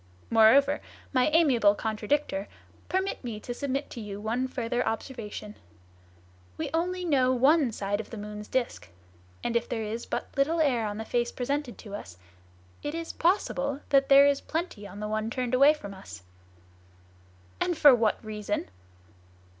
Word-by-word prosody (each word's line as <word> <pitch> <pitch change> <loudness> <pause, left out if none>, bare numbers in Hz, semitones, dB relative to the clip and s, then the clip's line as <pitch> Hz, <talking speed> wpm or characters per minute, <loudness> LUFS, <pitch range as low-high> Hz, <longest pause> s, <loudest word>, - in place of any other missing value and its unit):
Moreover, 270 +6 +5 0.3
my 255 -1 +3
amiable 270 -10 +4
contradictor, 215 0 -1 0.4
permit 380 -3 -1
me 230 -4 -5
to 245 - -5
submit 275 +2 -3
to 235 - -7
you 205 -1 -6
one 235 +5 -1
further 245 -1 -2
observation. 225 -3 -5 1.0
We - - -3
only 360 +2 -1
know 265 -6 +3
one 275 +1 +4
side 205 -1 -2
of - - -14
the 230 - -7
moon's 210 0 -7
disc; 240 - -2 0.5
and 240 0 -2
if 235 0 0
there 225 -2 -2
is 220 +2 -5
but - - -4
little 310 +5 +2
air 250 -8 +2
on 205 0 -4
the 220 - -5
face 240 +1 0
presented 275 0 -3
to 205 -3 -11
us, 90 - -8 0.6
it 295 +2 -4
is 330 0 -5
possible 280 -6 0
that 275 -1 +4
there 275 0 +8
is 285 -1 +2
plenty 315 - -4
on 205 +1 -10
the 210 - -3
one 215 +1 -2
turned 250 0 -3
away 280 +4 +6
from 200 -9 -9
us." 90 - -11 1.4
"And 350 -2 0
for 290 -3 +8
what 225 -2 +1
reason?" 210 - -3
245 Hz, 160 wpm, -28 LUFS, 215-280 Hz, 1.4 s, there